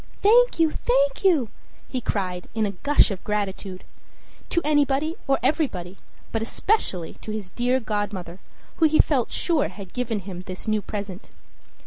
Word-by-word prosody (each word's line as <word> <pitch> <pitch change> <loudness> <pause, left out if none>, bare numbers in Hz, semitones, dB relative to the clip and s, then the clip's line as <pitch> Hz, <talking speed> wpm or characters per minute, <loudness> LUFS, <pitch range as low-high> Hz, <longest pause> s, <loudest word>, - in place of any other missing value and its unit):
"Thank 485 +4 +5
you, 320 -1 +4
thank - - +1
you!" 315 - +4 0.4
he 255 - -3
cried, 185 -5 -2
in 220 -1 +2
a 200 - -1
gush 280 +5 +3
of 190 - -5
gratitude 195 -2 -3 0.7
to - - +2
anybody 290 +1 +2
or 275 - +3
everybody, 195 - 0 0.4
but 225 - -1
especially 225 - 0
to - - -9
his 215 -3 -4
dear 245 +5 +1
godmother, 205 -6 -3 0.4
who 320 - +5
he 310 0 +3
felt 265 -6 +3
sure 330 -4 +1
had 195 -4 -10
given 235 -4 -2
him 185 -2 -7
this 185 +3 -8
new 215 -1 +2
present. 200 -2 -6
220 Hz, 155 wpm, -24 LUFS, 195-300 Hz, 0.7 s, Thank